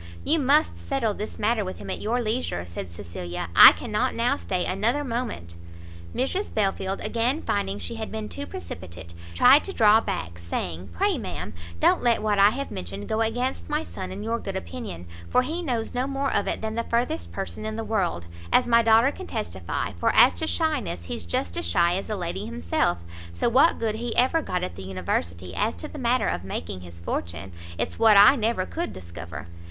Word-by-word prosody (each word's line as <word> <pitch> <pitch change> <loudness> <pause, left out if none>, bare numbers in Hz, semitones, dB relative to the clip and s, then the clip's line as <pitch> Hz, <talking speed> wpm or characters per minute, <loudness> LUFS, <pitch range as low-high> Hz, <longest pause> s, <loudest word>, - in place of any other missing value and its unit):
"You 320 +2 +2
must 290 +3 +3
settle 255 -7 -1
this 210 +1 -6
matter 215 +1 +1
with 185 -1 -5
him - - -6
at - - -4
your 235 +4 0
leisure," 215 - -2
said 85 +1 -6
Cecilia, 85 -1 -6
"I - - +12
cannot - - -1
now - - +2
stay 85 - -2
another 230 +10 0
moment." 230 - -4 0.6
Mrs 370 +11 -1
Belfield, 195 -2 -1
again 245 +7 0
finding 200 -1 -1
she 235 - -5
had 220 -1 -5
been 220 -1 -4
too 95 - -6
precipitate, 85 0 -8 0.2
tried 270 - +7
to 390 - -3
draw 220 - +6
back, 85 - -4
saying 85 +1 -4
"Pray, 85 - +1
ma'am, - - -5 0.3
don't - - +4
let 235 -3 +2
what 210 -2 +1
I 200 +1 +8
have 275 +5 -4
mentioned 95 +3 -6
go 220 - 0
against 245 +6 -1
my 300 +1 0
son 185 -9 -7
in 195 +2 -6
your 230 +1 -1
good 195 -3 -5
opinion, 190 - -6 0.2
for 250 - +3
he 320 +7 -3
knows 245 -9 -2
no 250 +2 0
more 275 0 -1
of 205 - +1
it - - -2
than 220 0 -3
the 230 +1 -1
furthest 235 - -1
person 85 0 -5
in 215 0 -3
the 225 - -3
world, 190 - -1 0.3
as - - +5
my 235 -1 +5
daughter 230 +4 +5
can 375 +4 -9
testify - - -3
for - - +3
as - - +7
to 320 - -2
shyness, 300 - -1
he's 85 0 -5
just 85 +1 -2
as - - -2
shy 170 - +3
as 195 - -4
a 215 - -1
lady 175 -3 -4
himself; 80 +2 0 0.4
so - - 0
what 265 +8 +5
good 225 -2 -1
he 230 +2 -3
ever 260 +7 +3
got 180 - -2
at 90 - -4
the 95 - -8
University, 90 -1 -3
as 220 - 0
to 305 - -6
the 300 - -9
matter 250 0 +2
of 90 - -2
making 90 -1 -5
his 85 -1 -11
fortune, 85 +2 -4 0.3
it's - - -3
what 220 -2 +7
I 205 +7 +9
never 225 -6 0
could 340 - -4
discover. 85 -1 -8
210 Hz, 205 wpm, -25 LUFS, -, 0.6 s, I